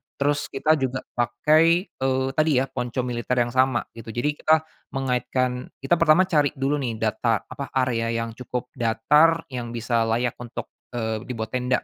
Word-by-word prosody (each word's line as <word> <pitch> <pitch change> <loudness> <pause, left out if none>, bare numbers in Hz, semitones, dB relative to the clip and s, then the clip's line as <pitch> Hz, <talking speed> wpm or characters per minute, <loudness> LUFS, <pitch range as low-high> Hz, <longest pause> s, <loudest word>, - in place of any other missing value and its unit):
terus 145 +1 0
kita 150 +3 +1
juga 130 0 -2
pakai, 155 +9 +3
eee, 130 0 0
tadi 155 +1 +2
ya 135 - -8
ponco 125 0 -2
militer 125 0 -2
yang 120 - -5
sama 130 -1 +2
gitu 115 -1 -12
jadi 145 +5 +1
kita 155 0 +3 0.3
mengaitkan 125 -1 -1 0.2
kita 165 +5 +2
pertama 165 +3 +6
cari 150 -5 +1
dulu 140 +2 0
nih 120 -4 -2
data 110 0 0
apa 140 - -7
area 125 -3 +1 0.2
yang 115 - -6
cukup 125 +1 -6
datar 150 +8 +3
yang 120 -2 -5
bisa 115 -1 0
layak 120 +1 0
untuk, 120 -1 -7 0.2
eee, 110 -2 -1
dibuat 110 -3 -4
tenda 125 0 0
125 Hz, 165 wpm, -24 LUFS, 120-145 Hz, 0.3 s, pertama